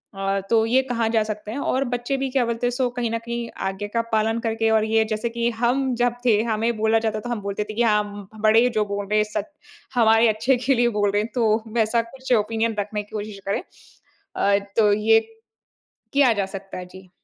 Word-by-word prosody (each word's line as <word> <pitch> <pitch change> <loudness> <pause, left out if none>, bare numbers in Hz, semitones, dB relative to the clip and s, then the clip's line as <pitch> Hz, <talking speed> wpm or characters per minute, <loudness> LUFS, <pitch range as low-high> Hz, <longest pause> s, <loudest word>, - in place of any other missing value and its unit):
अ, 195 0 -1
तो 225 -1 +4
ये 255 +3 +3
कहाँ 230 -2 0
जा 225 -1 +2
सकते 215 0 -6
हैं। 245 - -5
और 270 -1 0
बच्चे 245 +3 -1
भी 270 0 -2
क्या 255 -3 +2
बोलते 235 +1 -1
हैं - - 0
सो 250 0 0
कहीं 235 -2 0
न 230 - 0
कहीं 235 0 -4 0.2
आज्ञा 195 +2 -4
का 230 - +2
पालन 220 +1 +1
करके 225 -1 0
और 220 -1 +3
ये 220 0 +3
जैसे 215 +1 -2
कि 235 0 -1
हम 255 +2 +1
जब 245 0 +1
थे, 215 -3 +4
हमें 225 0 -1
बोला 220 +1 +3
जाता 220 -1 -1
है - - -5
तो 240 - -6
हम 235 -3 -2
बोलते 200 +1 -3
थे 215 - -4
कि 235 - -1
हाँ, 210 -2 +3
उम, 205 0 -8
उ - - -12
बड़े 220 +3 +5
जो 215 -3 0
बोल 200 0 -4
रहे 210 +1 +2
हैं 210 - +4
सच 205 - -1 0.5
हमारे 225 0 +5
अच्छे 225 +5 +2
के 270 - +4
लिए 240 0 +3
बोल 205 -1 +2
रहे 205 +1 +1
हैं 220 - -5
तो 220 -2 +2
वैसा 225 +1 +2
कुछ 260 +2 -4
ओपिनियन 225 0 +1
रखने 210 +1 -3
की 205 - -24
कोशिश 205 -1 -5
करें। 195 - 0 0.7
अ, 200 0 +3 0.2
तो 210 -2 +5
ये, 220 +2 +4 0.9
किया 275 -4 +5
जा 200 -3 -1
सकता 195 0 -8
है। 180 - -6
जी। 185 0 -14
225 Hz, 240 wpm, -23 LUFS, 210-235 Hz, 0.9 s, बड़े